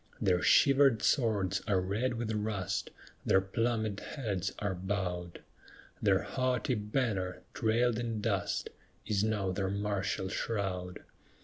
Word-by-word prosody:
Their 90 -2 +2
shivered 135 -5 +5
swords 110 -8 +2
are 100 -3 +3
red 110 +7 -1
with 115 -1 -2
rust; 105 -3 -2 0.3
Their 95 - +4
plumèd 110 +1 -1
heads 100 - -3
are 100 -2 -1
bowed; 90 -2 -3 0.6
Their 100 -2 +3
haughty 130 -2 0
banner, 105 -4 -1
trailed 115 +1 +2
in 115 -2 -2
dust, 100 -5 -1 0.3
Is 105 -1 +1
now 105 -3 0
their 95 0 -1
martial 100 -1 -1
shroud. 95 -4 -3
105 Hz, 120 wpm, -32 LUFS, 95-115 Hz, 0.6 s, shivered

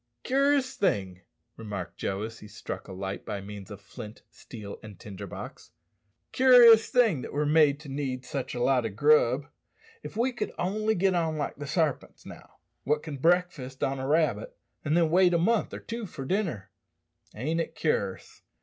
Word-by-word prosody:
"Cur'ous 275 0 +2
thing," 95 - 0 0.4
remarked 105 -5 -6
Joe, 100 +1 -2
as 115 +1 -7
he 105 - -11
struck - - -7
a - - -9
light 95 +1 -5
by 105 -2 -4
means 100 -1 -9
of - - -9
flint, 105 +1 -10
steel, 105 -4 -10
and 105 -5 -12
tinder 100 -3 -8
box - - -9 0.6
"cur'ous 245 -4 +8
thing 225 - +3
that - - -7
we're 150 +1 0
made 150 -1 +4
to 150 - -11
need 135 -2 -4
sich 130 0 -4
a - - -3
lot 130 -2 +3
o' 115 - -2
grub. 135 +3 +3 0.6
If - - -9
we 245 +3 +2
could 240 - -4
only 215 +4 0
get 190 +1 +2
on 165 -3 0
like 145 - -3
the 145 0 -6
sarpints, 155 -3 -1
now, - - -13 0.3
wot 150 +2 0
can 150 -3 -6
breakfast 165 -5 0
on 135 0 -1
a 130 - -3
rabbit, 165 - 0 0.3
and 155 +2 +1
then 165 -2 +3
wait 180 0 +5
a - - +5
month 215 +6 +1
or - - -6
two 230 -2 -6
for 140 -5 -7
dinner! 135 - -2 0.6
Ain't 155 +9 -1
it - - -6
cur'ous?" 100 - -2
150 Hz, 185 wpm, -28 LUFS, 115-185 Hz, 0.6 s, cur'ous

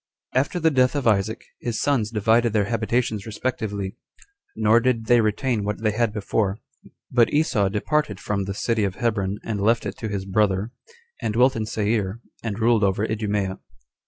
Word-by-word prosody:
1. 130 - +3
After 150 +5 -3
the 160 -1 +3
death 130 -1 +3
of 145 - -1
Isaac, 110 0 +1 0.2
his 120 -2 -3
sons 130 -7 +1
divided 115 +1 +2
their 105 -2 +2
habitations 115 -1 -1
respectively; 105 -3 -3 0.6
nor 110 +1 +4
did 120 -2 0
they 120 0 +5
retain 110 +1 0
what 105 +2 -3
they 110 - +3
had 115 +1 +1
before; 105 -1 -1 0.5
but 120 -2 +4
Esau 125 -10 +2
departed 105 +1 -1
from 100 -1 -2
the 100 0 -4
city 115 0 0
of 100 -2 -1
Hebron, 100 -4 -1
and 105 -3 -3
left 115 +2 +2
it 100 0 -5
to 110 - -3
his 100 -2 -3
brother, 100 +1 +1 0.5
and 105 - -2
dwelt 130 +3 +4
in 110 -1 -2
Seir, 105 -1 -1 0.2
and 110 -3 -3
ruled 115 -1 +3
over 100 +2 +2
Idumea. 105 -3 -2
110 Hz, 180 wpm, -23 LUFS, 100-120 Hz, 0.6 s, they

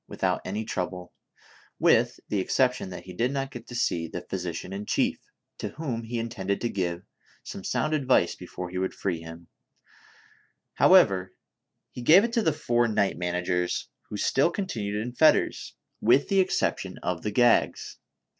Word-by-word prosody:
without - - -1
any 105 +4 -3
trouble, 90 -4 -4 0.6
with - - +3
the 105 - -1
exception 125 +2 +1
that 90 - -8
he 90 - -10
did 120 +8 0
not 135 -1 -3
get 120 -2 -9
to 120 - -8
see 85 -8 0
the 85 - -5
physician 90 0 -4
in 100 +1 -4
chief, - - 0 0.4
to - - -3
whom 130 -8 -4
he 120 +1 -4
intended 100 -4 -2
to 120 - -1
give 90 -4 -2 0.4
some 95 - -8
sound 155 +9 -1
advice 130 - +2
before 90 0 -7
he 90 - -3
would 95 - -2
free 90 -4 -2
him; 85 +1 -10 1.3
however, 95 -1 +5 0.6
he 125 - -8
gave 165 +11 +7
it 235 0 -2
to 235 - +2
the 160 - +2
four 120 -5 +1
night 105 -3 +1
managers, 90 0 -1 0.2
who 105 - -5
still 135 +9 +2
continued 110 - -3
in 120 +3 -4
fetters, 155 +5 +2 0.3
with 125 +5 +4
the 195 - +3
exception 185 0 0
of 90 -2 -2
the 105 - -2
gags. 120 +3 +2
105 Hz, 165 wpm, -27 LUFS, 90-125 Hz, 1.3 s, gave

